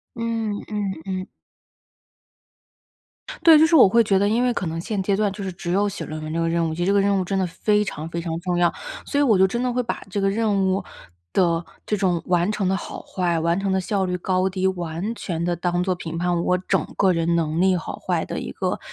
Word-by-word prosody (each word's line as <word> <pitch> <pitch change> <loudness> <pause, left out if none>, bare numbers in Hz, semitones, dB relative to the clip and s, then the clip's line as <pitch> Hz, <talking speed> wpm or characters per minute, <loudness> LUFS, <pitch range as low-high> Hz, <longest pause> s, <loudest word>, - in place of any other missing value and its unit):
嗯， 230 -2 -2 0.2
嗯， 205 -2 -2
嗯。 185 0 -3 2.2
对， 325 -2 +8
就 315 - +6
是 330 - +1
我 260 -10 +8
会 230 +4 +5
觉 195 -2 +3
得 200 +1 +2
因 230 +3 +2
为 250 - +2
可 195 -6 -3
能 165 0 -3
现 200 +2 -2
阶 195 +1 +1
段 205 -1 +1
就 200 0 -7
是 190 - -4
只 175 0 -4
有 200 +2 +2
写 200 - -5
论 155 0 -6
文 155 0 -5
这 165 - -2
个 165 - +1
任 165 -1 +1
务， 160 - -3
其 175 - -3
实 - - -1
这 200 - +3
个 200 - +4
任 200 0 +2
务 185 - 0
真 195 +2 -1
的 185 - +1
非 210 +4 +1
常 160 -4 -5
非 170 +1 -4
常 165 -1 -3
重 180 0 -1
要， 175 -1 +3 0.3
所 285 - -1
以 - - +4
我 225 -9 +4
就 190 - +6
真 235 +5 -2
的 250 - 0
会 250 +1 0
把 230 - -4
这 200 +1 -1
个 195 - +2
任 205 -2 +1
务 190 0 0 0.5
的 170 -2 +2 0.2
这 210 - 0
种 180 -4 0
完 175 +1 +2
成 200 -3 -1
的 190 - +1
好 - - -7
坏， 175 -3 -1
完 170 +2 +1
成 195 -1 -1
的 190 - +2
效 195 +1 -1
率 180 -1 -1
高 185 +1 +1
低， 190 0 -1
完 180 +3 -2
全 170 -7 -4
地 175 0 0
当 175 +1 0
做 185 0 0
评 165 -2 -6
判 175 -1 0
我 180 - +2
整 185 - 0
个 190 -2 +4
人 165 0 +1
能 160 0 0
力 190 0 +4
好 170 - -5
坏 - - -1
的 - - -4
一 - - -5
个 - - -2
190 Hz, 275 characters per minute, -23 LUFS, 175-205 Hz, 2.2 s, 对